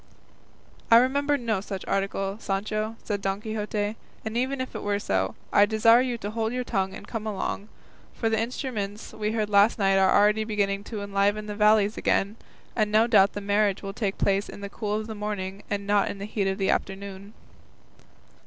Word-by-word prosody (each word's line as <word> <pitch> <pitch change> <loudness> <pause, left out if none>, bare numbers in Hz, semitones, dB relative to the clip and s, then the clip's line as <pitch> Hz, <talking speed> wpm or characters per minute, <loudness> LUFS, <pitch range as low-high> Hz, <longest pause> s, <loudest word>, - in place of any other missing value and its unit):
"I 230 - +9
remember 285 +4 +3
no 225 -6 -1
such 195 -2 -6
article, 195 0 -1
Sancho," 215 +2 -2
said 205 -2 -2
Don 195 0 -1
Quixote; 210 -1 -3 0.3
"and 220 +1 -4
even 260 +3 0
if 260 - -4
it - - -5
were 205 0 0
so, 95 - -1 0.2
I 205 - +6
desire 230 +2 +5
you 250 -2 -1
to 205 -1 -5
hold 220 0 -1
your 250 0 -1
tongue 195 -5 -1
and - - -10
come 220 -2 -4
along; 205 0 -3 0.5
for 225 - -1
the 225 0 +1
instruments 225 -4 -4
we 215 0 -2
heard 215 -2 0
last 200 +2 +5
night 195 -2 +3
are 190 -1 +4
already 210 +1 +4
beginning 200 -2 -1
to 210 -3 -5
enliven 200 +1 +1
the 210 - -5
valleys 210 0 +3
again, 200 +3 +1 0.4
and 215 -3 +1
no 215 +2 +5
doubt 200 -4 +5
the 205 - -5
marriage 200 0 +1
will 195 0 -5
take 200 -2 -2
place 200 +1 +1
in - - -9
the 200 - -5
cool 210 0 -3
of 215 0 -2
the 220 - -6
morning, 205 -2 -4
and 200 -1 -2
not 205 0 +2
in - - -5
the 200 - -5
heat 205 -2 -1
of 190 0 -1
the 195 -2 +1
afternoon." 195 +1 -4
210 Hz, 200 wpm, -26 LUFS, 200-220 Hz, 0.5 s, I